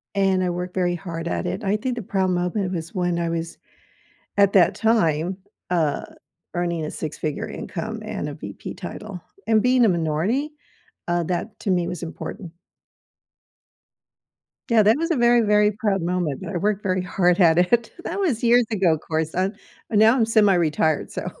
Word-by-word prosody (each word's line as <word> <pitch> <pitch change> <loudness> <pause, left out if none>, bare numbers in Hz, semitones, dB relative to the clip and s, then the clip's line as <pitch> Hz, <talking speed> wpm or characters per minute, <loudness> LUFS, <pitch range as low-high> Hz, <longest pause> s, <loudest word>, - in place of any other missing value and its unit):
and 190 -1 +2
I 180 - 0
worked 180 +1 -4
very 175 -2 0
hard 170 -1 -6
at - - -2
it. 195 +4 -3
I 200 +1 +1
think 250 +3 -3
the 240 - -4
proud 190 -2 0
moment 180 +2 -1
was 165 -2 -5
when, 175 -2 0
I 170 -1 -1
was 165 0 -4 0.8
at 200 -1 +4
that 180 -4 +5
time, 180 -6 +1 0.3
uh, 165 -5 0 0.5
earning 170 -2 -1
a 155 - -5
6 155 -2 -5
figure 155 -2 -3
income - - -6
and - - -4
a - - -6
VP - - -8
title, 205 -4 -7 0.3
and 220 -1 +4
being 250 +1 +4
a - - +4
minority, 175 - 0 0.6
uh, 175 0 +1
that 180 +6 -4
to 200 - -1
me 175 -2 +1
was 175 -1 -5
important. 170 +2 -7 2.2
Yeah, 230 -2 +5
that 215 +4 +4
was 330 +2 -1
a - - +3
very, 240 0 +5
very 210 -1 +4
proud 200 -2 0
moment, 170 -5 -2
I 205 - -5
worked 205 +3 0
very 185 -2 0
hard 180 0 +1
at 165 -2 +5
it. 220 +6 +2
That - - -3
was 280 - 0
years 240 0 +5
ago, 185 -7 +2
‘course, 160 +1 -3
uh, 185 +2 +1 0.4
now 220 +2 +5
I'm 235 -4 +3
semi 220 -3 +4
retired, 155 -3 +1
so, - - -5
185 Hz, 180 wpm, -23 LUFS, 170-215 Hz, 2.2 s, that